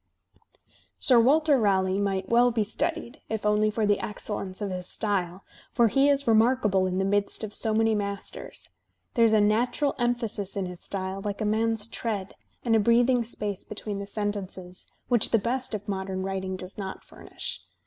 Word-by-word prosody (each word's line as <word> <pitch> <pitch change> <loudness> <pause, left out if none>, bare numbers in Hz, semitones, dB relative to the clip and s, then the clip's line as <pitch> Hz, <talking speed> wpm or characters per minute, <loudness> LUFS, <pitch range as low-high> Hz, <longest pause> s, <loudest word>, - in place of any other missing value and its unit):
"Sir 250 -3 +5
Walter 290 +3 +4
Raleigh 190 -2 +2
might 195 -2 -1
well 240 +1 +5
be 225 -2 +1
studied, 235 +5 -3
if 220 -1 -3
only 210 0 +3
for 215 0 0
the 205 -1 +2
excellence 205 -3 -5
of 205 -2 -3
his 180 -1 -4
style, 190 -4 -2 0.3
for 235 -1 +4
he 275 +5 +4
is 280 0 +2
remarkable 220 -4 +3
in 185 0 -2
the 190 - +1
midst 200 +2 0
of 210 -1 -5
so 220 - 0
many 225 +1 +3
masters. 200 -1 -5 0.4
There 230 -2 +4
is 220 - +3
a 215 - +5
natural 240 +7 +2
emphasis 235 -5 -1
in 195 -2 -1
his 180 -1 -7
style, 190 0 -4
like 205 0 -4
a 215 - -1
man's 220 0 +1
tread, 215 -4 -4 0.3
and 230 -2 +3
a - - +5
breathing 240 +3 +4
space 210 -4 -4
between 205 -1 -5
the 200 - -6
sentences, 195 -3 -4 0.2
which 240 -4 +4
the 230 - +4
best 240 +2 -1
of 205 0 -7
modem 190 -1 -3
writing 190 -1 -3
does 185 +2 -8
not 190 -1 -6
furnish. - - -6
210 Hz, 180 wpm, -27 LUFS, 195-230 Hz, 0.4 s, Sir